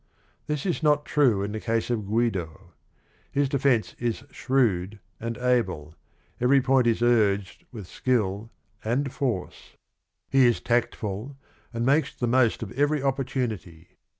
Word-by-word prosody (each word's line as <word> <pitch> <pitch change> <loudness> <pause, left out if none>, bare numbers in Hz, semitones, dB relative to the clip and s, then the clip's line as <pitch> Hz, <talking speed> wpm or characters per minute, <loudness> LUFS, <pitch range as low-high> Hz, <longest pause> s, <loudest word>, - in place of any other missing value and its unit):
This 150 -2 -2
is 180 -4 -1
not 150 -1 +2
true 120 -10 +2
in 100 - -3
the 110 - -4
case 115 +1 -1
of 110 -4 -2
Guido. 95 -6 -2 0.6
His 140 0 +1
defense 135 -4 +1
is 120 +1 -2
shrewd 110 -9 0 0.2
and 115 0 -4
able: 120 -12 0 0.5
every 130 +3 +4
point 130 -1 +3
is 115 0 +1
urged 100 -6 +1
with 110 -5 -8
skill 110 -1 -1 0.3
and 130 +5 -1
force. 120 - -4 0.6
He 135 -2 +6
is 120 - +2
tactful 120 +1 -2 0.3
and 115 -1 -2
makes 145 +4 +2
the 120 - -2
most 120 -1 +2
of 100 - -7
every 145 +1 +1
opportunity. 120 - -3
120 Hz, 140 wpm, -26 LUFS, 105-135 Hz, 0.6 s, He